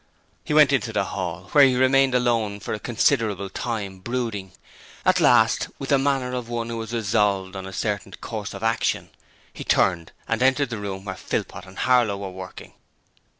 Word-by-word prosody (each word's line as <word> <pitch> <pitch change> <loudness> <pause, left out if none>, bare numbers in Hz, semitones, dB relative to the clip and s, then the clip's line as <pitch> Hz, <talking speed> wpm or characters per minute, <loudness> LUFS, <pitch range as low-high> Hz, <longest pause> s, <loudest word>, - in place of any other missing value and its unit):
He - - -6
went 150 -2 +6
into 120 -4 +1
the 105 -3 +1
hall, 90 -2 -5
where 145 - +7
he 130 -2 +5
remained 130 +1 +4
alone 115 -4 +1
for - - -5
a 105 - -3
considerable 110 -5 0
time, 100 -4 -4
brooding. 110 -4 -4 0.5
At - - +4
last, - - +4
with 135 - -6
the 140 -2 +4
manner 135 -2 0
of 125 -2 -4
one 115 -1 -3
who 115 -1 -4
has 110 0 -7
resolved 100 -4 0
on 95 0 -6
a - - -7
certain 95 - -3
course - - -5
of - - -8
action, - - 0 0.4
he - - -7
turned 85 -3 +1 0.2
and 115 +1 -1
entered 130 0 +3
the 115 - -3
room 100 -1 -5
where 95 - -3
Philpot 95 - -4
and 95 +1 -14
Harlow 120 -5 +3
were 100 -1 -6
working. 95 0 -10
115 Hz, 190 wpm, -24 LUFS, 95-125 Hz, 0.5 s, where